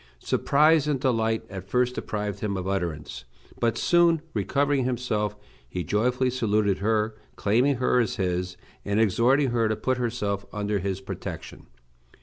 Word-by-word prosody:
Surprise 150 - +3
and 145 -3 0
delight 115 -4 +1
at 95 -2 -8
first 125 +3 +2
deprived 105 -4 -4
him 100 -2 -2
of 95 0 -4
utterance, 85 -6 -3 0.4
but 115 -1 +1
soon 170 -1 +4
recovering 140 -1 +1
himself, 115 -5 -1 0.3
he 90 +4 -3
joyfully 125 - +1
saluted 105 -5 +1
her, 110 +1 +1 0.2
claiming 125 +7 +2
her 125 0 +2
as 115 - 0
his, 90 -2 -2 0.3
and 100 +1 0
exhorting 120 +6 +3
her 115 -2 +1
to 110 - +1
put 125 +4 -1
herself 105 -5 -2
under 105 -1 -1
his 95 0 -3
protection. 95 - -7
110 Hz, 145 wpm, -26 LUFS, 100-125 Hz, 0.4 s, soon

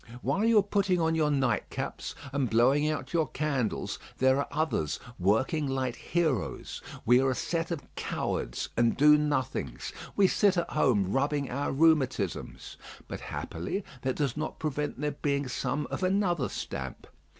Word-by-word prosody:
While 205 +4 +1
you 230 -1 +5
are 205 - +6
putting 200 -3 +1
on 160 -1 +2
your 155 -2 +2
night 130 -8 +1
caps - - -5 0.2
and 140 -4 +1
blowing 135 +7 +4
out 140 -2 -3
your 165 -2 +2
candles 140 -7 -2 0.2
there 130 +1 +4
are 140 - -1
others 150 - -1 0.2
working 130 - +2
like 130 -2 -1
heroes. 155 - -1 0.2
We 125 +2 +6
are 135 - +2
a 130 - 0
set 165 +5 -2
of 165 -5 -3
cowards - - -3
and 115 0 +2
do 150 +2 +7
nothings; 130 - -1 0.2
we 200 -1 +5
sit 195 0 +3
at 170 - -1
home 110 -11 +2
rubbing 140 +1 0
our 140 +3 -1
rheumatisms; 135 - +1 0.3
but - - -5
happily 90 - -4 0.2
that 130 0 -1
does 140 -5 -1
not 155 +1 -4
prevent 150 -3 -2
there 150 0 0
being 140 -1 -1
some 135 +3 -2
of - - -3
another 185 -6 +1
stamp. - - -5
145 Hz, 160 wpm, -29 LUFS, 130-160 Hz, 0.3 s, do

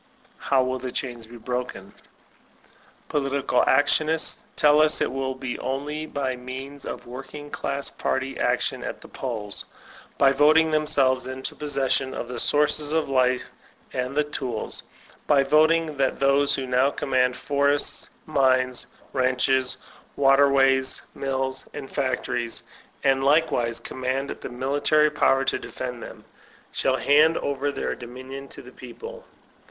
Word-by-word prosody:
How 135 -2 +2
will 130 0 -2
the 125 0 -5
chains 120 -4 -4
be 120 +1 -11
broken? 120 -5 -5 1.1
Political 140 -3 +1
actionists 155 +3 +2 0.2
tell 150 0 +5
us 155 0 +4
it - - 0
will 130 0 -2
be 130 -2 -5
only 150 +4 -3
by 135 -4 -2
means 130 +3 -7
of - - -6
working 135 +4 -9
class 140 0 -3
party 135 0 -2
action - - 0
at - - -5
the - - -12
polls; 110 -6 -5 0.5
by 135 - +5
voting 155 +3 +5
them 155 0 +1
selves 130 -3 +2
into 130 0 -4
possession 135 -2 0
of - - -4
the 125 -1 -5
sources 150 +2 +2
of 160 -3 0
life 130 -1 +2 0.4
and 125 +2 -3
the 150 - +4
tools; 130 -6 -3 0.5
by 140 -2 +5
voting 155 +2 +3
that 135 -1 0
those 140 +1 +3
who 135 - -3
now 130 +2 +3
conunand 130 -3 +1
forests, 140 0 0 0.2
mines, 130 -4 +2 0.3
ranches, 130 0 +1 0.4
waterways, 135 -1 +4
mills 135 -1 -2
and 145 -2 -7
factories, 125 -3 -2 0.4
and 135 -1 +3
likewise 135 -6 +2
command 130 +3 -3
the - - -7
military 145 +4 +2
power 135 -2 +2
to - - 0
defend 125 -2 -6
them, - - -10 0.5
shall 130 -1 +1
hand 155 +4 +4
over 140 0 -1
their - - -3
dominion 130 +3 -9
to - - -12
the - - -12
people. 475 +1 -10
135 Hz, 140 wpm, -25 LUFS, 130-145 Hz, 1.1 s, tell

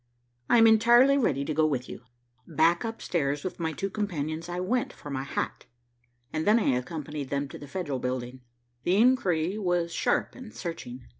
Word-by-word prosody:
"I - - +6
am 225 - +7
entirely 235 +5 +6
ready 140 - +1
to 155 - -2
go 155 +1 +3
with 130 -4 -2
you." - - -8 0.5
Back 165 +2 +2
up 225 0 -5
stairs 145 -4 -1
with 185 - -5
my 160 -1 -1
two 195 +6 -4
companions 165 -5 -3
I 175 +1 -3
went 240 +7 0
for 145 - -10
my 130 -1 -2
hat, 135 - -4 0.7
and 155 0 -1
then 215 +2 +6
I - - +1
accompanied 140 +2 -3
them 140 0 -1
to - - -9
the 145 - -10
Federal 145 -5 -3
building. 125 0 -4 0.4
The 180 - +1
inquiry 200 -6 +2
was 175 -3 0
sharp - - 0
and 250 -4 -11
searching. 130 -8 -7
165 Hz, 190 wpm, -27 LUFS, 140-205 Hz, 0.7 s, am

